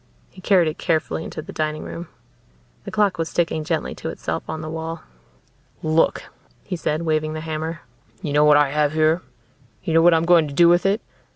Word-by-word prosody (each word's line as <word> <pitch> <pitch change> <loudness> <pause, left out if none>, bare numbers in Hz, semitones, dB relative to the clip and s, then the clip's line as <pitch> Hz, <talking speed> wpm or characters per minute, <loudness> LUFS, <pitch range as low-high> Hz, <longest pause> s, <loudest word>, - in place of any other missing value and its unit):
He - - -14
carried 185 -3 +4
it 155 - -4
carefully 160 -1 -1
into 155 - -7
the - - -10
dining 155 0 -2
room. 170 0 -7 0.8
The - - -6
clock 205 -5 +1
was 165 - -2
ticking 165 -2 0
gently 160 0 -2
to - - -6
itself 80 0 -4
on 160 0 -4
the 155 - -6
wall. 160 +1 -5 0.8
"Look," 155 +1 +2 0.4
he 185 - -4
said, 155 -1 -2
waving 155 -1 0
the 155 - -5
hammer. 160 +1 -4 0.4
"You 150 -4 -2
know 150 +1 +5
what 150 -1 +6
I 145 -2 +3
have 150 0 +1
here? 160 +2 +2 0.6
You 165 - -2
know 165 - +6
what 170 0 +6
I'm 165 +1 +1
going 170 -3 +5
to 140 - -8
do 170 +2 +6
with 175 +2 +4
it? 200 +3 +1
160 Hz, 205 wpm, -22 LUFS, 155-170 Hz, 0.8 s, what